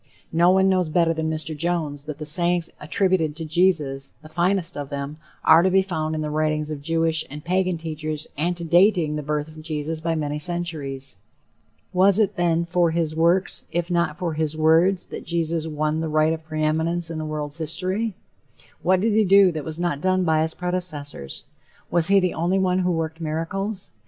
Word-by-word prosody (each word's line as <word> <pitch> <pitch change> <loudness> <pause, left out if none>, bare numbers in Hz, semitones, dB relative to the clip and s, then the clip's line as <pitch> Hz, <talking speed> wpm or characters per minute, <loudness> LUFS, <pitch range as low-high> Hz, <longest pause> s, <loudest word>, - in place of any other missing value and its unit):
No 170 +2 +4
one 190 +1 +4
knows 185 -3 +2
better 165 +1 +2
than 160 -1 -2
Mr. 155 0 -1
Jones 155 -3 -2
that 150 -2 -6
the 155 - -6
sayings 175 +2 +3
attributed 165 -1 +1
to 165 0 -6
Jesus 155 -5 +1
the 155 - -12
finest 175 +2 0
of 145 -1 -5
them 140 +1 -5 0.3
are 160 +1 +7
to 185 - +3
be 190 +1 +3
found 160 -4 -3
in 155 - -2
the 150 -1 -3
writings 155 0 -1
of 145 -2 -5
Jewish 165 +1 +1
and 150 +3 -9
Pagan 185 0 0
teachers 155 -1 -4
antedating 170 +1 +2
the 150 - -3
birth 150 0 -2
of 155 0 -12
Jesus 155 0 -3
by 165 0 -1
many 150 -1 -2
centuries. 150 - -3 0.8
Was 190 +2 +4
it, 215 -3 +2
then, 170 -1 +1
for 175 0 +2
his 160 -1 -1
"works," 170 +4 +2
if 175 +1 -2
not 170 -3 0
for 175 -3 -2
his 155 0 -1
"words," 165 +4 +3
that - - -8
Jesus 165 -1 -1
"won 155 0 -1
the 160 - -2
right 155 +1 +2
of 160 0 -6
preeminence 160 +2 0
in 160 - -4
the - - -3
world's 150 0 -4
history"? 185 +7 -1 0.7
What 185 0 +2
did 220 +1 +1
he 215 +1 +4
do 195 -1 +6
that 155 -3 -5
was 160 +2 -6
not 175 -5 -1
done 185 +1 +2
by 160 -2 +2
his 160 0 0
predecessors? 165 - -4 0.5
Was 170 -2 +3
he 200 0 +5
the 180 -2 0
only 175 +4 0
one 185 -1 +1
who 180 -1 +1
worked 165 0 -3
miracles? 185 +6 -3
165 Hz, 195 wpm, -23 LUFS, 155-180 Hz, 0.8 s, are